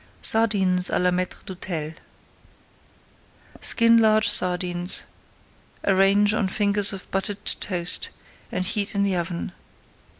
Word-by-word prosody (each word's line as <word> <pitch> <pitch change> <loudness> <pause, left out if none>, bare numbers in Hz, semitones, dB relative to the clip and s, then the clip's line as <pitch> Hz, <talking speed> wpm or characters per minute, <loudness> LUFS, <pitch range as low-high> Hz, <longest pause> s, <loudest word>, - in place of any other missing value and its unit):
SARDINES 190 -5 +4
À - - -1
LA 180 0 +1
MAÎTRE 180 0 -4
D'HÔTEL 170 -5 -6 1.7
Skin 230 -1 +3
large 215 -1 +3
sardines, 180 0 +1 0.8
arrange 195 +2 +2
on 215 -3 0
fingers 200 0 +1
of 195 -2 -8
buttered 195 +1 -4
toast, 180 -3 +1 0.4
and 185 0 -3
heat 205 0 -3
in 200 - +1
the 195 -2 -1
oven. 170 0 -4
195 Hz, 110 wpm, -22 LUFS, 180-205 Hz, 1.7 s, SARDINES